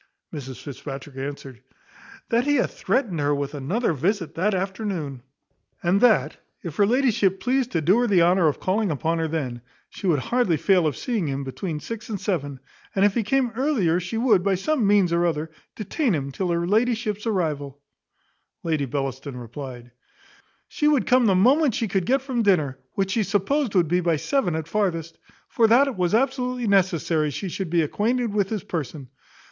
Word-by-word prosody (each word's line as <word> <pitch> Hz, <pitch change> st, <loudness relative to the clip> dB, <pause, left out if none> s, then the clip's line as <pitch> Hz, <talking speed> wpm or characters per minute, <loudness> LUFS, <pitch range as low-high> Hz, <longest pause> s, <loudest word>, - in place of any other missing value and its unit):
Mrs 135 Hz, -4 st, -7 dB
Fitzpatrick 140 Hz, 0 st, -8 dB
answered, 135 Hz, -2 st, -7 dB, 0.7 s
"That 235 Hz, +1 st, +2 dB
he 290 Hz, 0 st, +2 dB
had 255 Hz, -, +1 dB
threatened 210 Hz, -, -1 dB
her 145 Hz, 0 st, +1 dB
with 140 Hz, 0 st, -3 dB
another 165 Hz, -, -1 dB
visit 175 Hz, -, -1 dB
that 195 Hz, +4 st, 0 dB
afternoon, 185 Hz, -, -3 dB, 0.6 s
and 180 Hz, +3 st, +2 dB
that, 245 Hz, -3 st, +3 dB, 0.3 s
if 170 Hz, -5 st, -6 dB
her 200 Hz, -, +4 dB
ladyship 220 Hz, -6 st, +2 dB
pleased 255 Hz, +5 st, 0 dB
to 165 Hz, -, +1 dB
do 185 Hz, +9 st, +4 dB
her 245 Hz, -, +2 dB
the 185 Hz, -5 st, +4 dB
honour 175 Hz, 0 st, +4 dB
of 150 Hz, -, 0 dB
calling 200 Hz, +2 st, 0 dB
upon 165 Hz, +2 st, -1 dB
her 160 Hz, -, 0 dB
then, 135 Hz, -7 st, -3 dB, 0.3 s
she 195 Hz, -, -5 dB
would 165 Hz, -4 st, +3 dB
hardly 195 Hz, -, +1 dB
fail 180 Hz, +1 st, +3 dB
of 150 Hz, -, -2 dB
seeing 225 Hz, -, -2 dB
him 140 Hz, 0 st, -3 dB
between 150 Hz, +4 st, -4 dB
six 230 Hz, +8 st, -7 dB
and 205 Hz, -3 st, -3 dB
seven; 145 Hz, -9 st, -2 dB, 0.4 s
and 195 Hz, +1 st, +4 dB
if 205 Hz, -, +3 dB
he 235 Hz, -, +1 dB
came 250 Hz, +3 st, +1 dB
earlier 230 Hz, -, +1 dB
she 180 Hz, +6 st, -4 dB
would, 225 Hz, -5 st, +3 dB
by 195 Hz, -1 st, +2 dB
some 245 Hz, +3 st, 0 dB
means 200 Hz, -4 st, +3 dB
or 170 Hz, 0 st, +2 dB
other, 160 Hz, -1 st, -2 dB, 0.2 s
detain 230 Hz, -, -1 dB
him 140 Hz, -2 st, -3 dB
till 180 Hz, +6 st, -2 dB
her 170 Hz, 0 st, 0 dB
ladyship's 220 Hz, +1 st, 0 dB
arrival." 150 Hz, -9 st, -2 dB, 0.8 s
Lady 155 Hz, -4 st, 0 dB
Bellaston 135 Hz, 0 st, -4 dB
replied, 125 Hz, 0 st, -8 dB, 0.8 s
"She 295 Hz, -, 0 dB
would 285 Hz, -8 st, +3 dB
come 250 Hz, -2 st, +4 dB
the 195 Hz, -, +4 dB
moment 260 Hz, -, +4 dB
she 225 Hz, -, -1 dB
could 190 Hz, -2 st, -1 dB
get 265 Hz, +1 st, +2 dB
from 260 Hz, -3 st, -1 dB
dinner, 155 Hz, -, +2 dB
which 195 Hz, -1 st, -1 dB
she 225 Hz, -, +1 dB
supposed 210 Hz, +5 st, 0 dB
would 175 Hz, -3 st, +4 dB
be 175 Hz, +3 st, +2 dB
by 170 Hz, -2 st, +2 dB
seven 180 Hz, -, 0 dB
at 160 Hz, -1 st, -4 dB
farthest; 165 Hz, -4 st, -2 dB, 0.3 s
for 230 Hz, -2 st, +3 dB
that 240 Hz, +5 st, +5 dB
it 275 Hz, -, -3 dB
was 180 Hz, +1 st, +1 dB
absolutely 250 Hz, -1 st, 0 dB
necessary 175 Hz, -6 st, +2 dB
she 185 Hz, +7 st, -4 dB
should 185 Hz, 0 st, -4 dB
be 170 Hz, 0 st, +2 dB
acquainted 230 Hz, -, -1 dB
with 200 Hz, -2 st, +1 dB
his 215 Hz, -5 st, -3 dB
person. 145 Hz, -4 st, -5 dB
185 Hz, 190 wpm, -24 LUFS, 155-225 Hz, 0.8 s, that